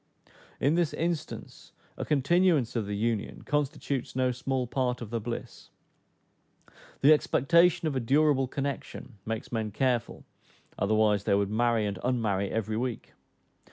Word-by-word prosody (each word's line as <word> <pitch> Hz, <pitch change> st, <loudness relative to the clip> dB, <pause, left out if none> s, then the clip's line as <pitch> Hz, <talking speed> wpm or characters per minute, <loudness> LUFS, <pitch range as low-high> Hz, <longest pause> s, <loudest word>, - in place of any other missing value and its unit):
In 140 Hz, +3 st, +2 dB
this 170 Hz, -2 st, +1 dB
instance 165 Hz, -1 st, -4 dB, 0.2 s
a -, -, -4 dB
continuance 150 Hz, -2 st, +2 dB
of 110 Hz, -4 st, -1 dB
the 100 Hz, 0 st, -3 dB
union 110 Hz, -1 st, -2 dB
constitutes 140 Hz, -3 st, -2 dB
no 130 Hz, -1 st, +2 dB
small 125 Hz, +1 st, -2 dB
part 125 Hz, 0 st, -1 dB
of 115 Hz, -3 st, -8 dB
the 115 Hz, -, -1 dB
bliss. 115 Hz, +2 st, -7 dB, 1.3 s
The 145 Hz, +3 st, +8 dB
expectation 170 Hz, +4 st, +3 dB
of 145 Hz, -, -2 dB
a -, -, +1 dB
durable 135 Hz, +2 st, +3 dB
connection 135 Hz, -4 st, -5 dB
makes 110 Hz, 0 st, -4 dB
men 110 Hz, -2 st, -1 dB
careful, 120 Hz, +2 st, -1 dB, 0.6 s
otherwise 105 Hz, -1 st, +2 dB
they -, -, +3 dB
would 100 Hz, 0 st, 0 dB
marry 115 Hz, 0 st, +2 dB
and 100 Hz, -3 st, -3 dB
unmarry 105 Hz, -6 st, 0 dB
every 110 Hz, -1 st, -2 dB
week. 120 Hz, -1 st, -4 dB
125 Hz, 140 wpm, -28 LUFS, 110-140 Hz, 1.3 s, The